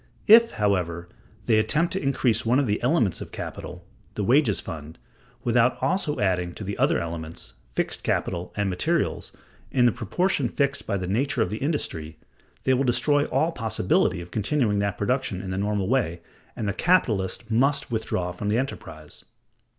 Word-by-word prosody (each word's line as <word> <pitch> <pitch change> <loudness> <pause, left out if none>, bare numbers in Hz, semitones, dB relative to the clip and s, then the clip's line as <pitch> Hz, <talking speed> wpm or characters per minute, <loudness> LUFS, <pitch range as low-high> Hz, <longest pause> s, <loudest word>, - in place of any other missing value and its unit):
If, 230 +2 +7
however, 90 -4 -1 0.4
they 110 -1 +4
attempt 150 +10 +1
to 190 - -1
increase 125 -4 +1
one 120 +2 +2
of 140 - +2
the 105 -2 -1
elements 120 - +1
of - - -8
capital, - - -7 0.3
the - - -2
wages - - +3
fund, 80 0 -7 0.5
without 120 +1 +3
also 170 -5 0
adding 90 -3 0
to - - -7
the 100 +1 -4
other - - +3
elements, 85 -1 -6 0.2
fixed 60 - -2
capital 85 0 -1
and 100 -1 +1
materials, 90 -1 -1 0.4
in 125 -2 +3
the 120 - +5
proportion 130 - 0
fixed 140 +2 -1
by 100 - 0
the 90 - -3
nature 115 +5 +1
of - - -4
the 110 - -3
industry, 80 - -3 0.5
they 130 - +3
will 130 +2 +2
destroy 145 +3 +2
all 160 +2 +1
possibility 110 - 0
of 85 0 -11
continuing 110 -1 +1
that 100 -1 -1
production 105 -3 -1
in 95 0 -5
the 95 - -3
normal 100 -1 0
way, 105 -10 0 0.3
and 105 - -3
the 100 - 0
capitalist 115 - +1
must 140 +4 +1
withdraw 95 -6 -2
from 100 +4 -4
the 105 - +2
enterprise. 80 - -6
110 Hz, 175 wpm, -25 LUFS, 90-135 Hz, 0.5 s, If